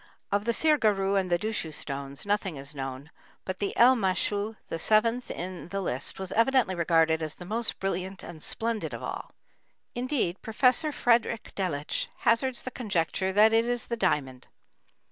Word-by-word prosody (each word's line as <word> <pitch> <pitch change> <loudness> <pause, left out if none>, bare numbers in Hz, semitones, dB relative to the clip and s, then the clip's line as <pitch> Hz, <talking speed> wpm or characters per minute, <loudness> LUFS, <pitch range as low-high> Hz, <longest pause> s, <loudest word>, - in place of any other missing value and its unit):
Of 200 +1 +1
the 235 - +2
sirgarru 215 -9 +2
and 190 -2 +1
dushu 175 -2 -1
stones 140 0 -4
nothing 205 -4 0
is 140 +2 -6
known, 135 +2 -6 0.3
but 185 -1 -4
the 200 - -1
elmêshu, 215 -2 +3
the 165 - -4
seventh 230 +6 +2
in 180 0 -6
the 195 +2 -3
list, 140 -6 -2
was 190 -1 -5
evidently 240 -3 +3
regarded 165 -2 +2
as 155 -1 -3
the 180 - -10
most 225 +4 -1
brilliant 190 0 -3
and 165 -3 -9
splendid 225 +4 -1
of - - -8
all; - - -6 0.6
indeed, 245 -8 -1
Prof. 255 +7 +2
Friedrich 235 -2 +1
Delitzsch 155 -7 -2
hazards 240 +2 +1
the 255 - -5
conjecture 190 -5 -1
that 215 +3 +5
it 225 +1 +3
is 245 -1 -1
the 235 - -2
diamond. 140 - -1
195 Hz, 160 wpm, -28 LUFS, 170-230 Hz, 0.6 s, that